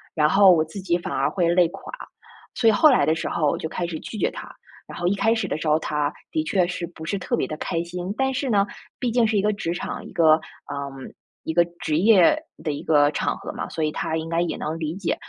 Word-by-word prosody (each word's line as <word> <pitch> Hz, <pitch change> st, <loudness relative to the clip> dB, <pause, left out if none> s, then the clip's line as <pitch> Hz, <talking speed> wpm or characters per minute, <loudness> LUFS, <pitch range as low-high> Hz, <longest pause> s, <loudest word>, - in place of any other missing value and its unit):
然 150 Hz, -2 st, +4 dB
后 195 Hz, +2 st, +7 dB
我 165 Hz, -3 st, +4 dB
自 160 Hz, +6 st, -9 dB
己 175 Hz, -2 st, +1 dB
反 175 Hz, -, -6 dB
而 -, -, +1 dB
会 175 Hz, -3 st, 0 dB
累 175 Hz, 0 st, +4 dB
垮， 195 Hz, +3 st, -10 dB, 0.6 s
所 230 Hz, -, +2 dB
以 -, -, +6 dB
后 310 Hz, +9 st, +6 dB
来 245 Hz, -, +4 dB
的 155 Hz, +2 st, +2 dB
时 -, -, -3 dB
候 155 Hz, -3 st, 0 dB
我 -, -, +1 dB
就 160 Hz, -, -5 dB
开 175 Hz, +1 st, -3 dB
始 165 Hz, -2 st, -4 dB
拒 220 Hz, -, -7 dB
绝 -, -, +1 dB
他， -, -, -9 dB, 0.4 s
然 -, -, -9 dB
后 175 Hz, -, 0 dB
一 195 Hz, -, +2 dB
开 225 Hz, +3 st, +2 dB
始 225 Hz, -, -2 dB
的 -, -, -2 dB
时 160 Hz, -, -6 dB
候， 155 Hz, +1 st, +3 dB
他 150 Hz, -2 st, -1 dB, 0.2 s
的 315 Hz, -1 st, 0 dB
确 185 Hz, -, +1 dB
是 175 Hz, -1 st, -4 dB
不 160 Hz, -2 st, -11 dB
是 200 Hz, +5 st, -1 dB
特 240 Hz, -, -1 dB
别 -, -, -1 dB
地 155 Hz, -, -5 dB
开 165 Hz, +1 st, -2 dB
心。 180 Hz, +2 st, -5 dB
但 265 Hz, 0 st, +1 dB
是 265 Hz, +1 st, -2 dB
呢， 200 Hz, -3 st, +3 dB, 0.3 s
毕 245 Hz, -2 st, -1 dB
竟 235 Hz, 0 st, +3 dB
是 215 Hz, -1 st, +1 dB
一 -, -, +3 dB
个 210 Hz, +1 st, +1 dB
职 170 Hz, -5 st, -3 dB
场， 175 Hz, -, -5 dB
一 -, -, -10 dB
个， 160 Hz, -2 st, +5 dB, 0.3 s
呃， 140 Hz, -1 st, -5 dB, 0.5 s
一 160 Hz, -, -3 dB
个 175 Hz, +1 st, +5 dB, 0.2 s
职 150 Hz, -, 0 dB
业 210 Hz, -, +5 dB, 0.2 s
的 155 Hz, -, -1 dB
一 145 Hz, -, -6 dB
个 145 Hz, -2 st, +4 dB
场 -, -, -1 dB
合 -, -, -7 dB
嘛， -, -, -5 dB
所 160 Hz, -, -3 dB
以 155 Hz, -, 0 dB
他 160 Hz, -, -2 dB
应 160 Hz, 0 st, -4 dB
该 165 Hz, 0 st, +1 dB
也 175 Hz, -, -2 dB
能 155 Hz, +2 st, -3 dB
理 160 Hz, 0 st, -3 dB
解。 195 Hz, -2 st, -1 dB
175 Hz, 295 characters per minute, -23 LUFS, 160-200 Hz, 0.6 s, 后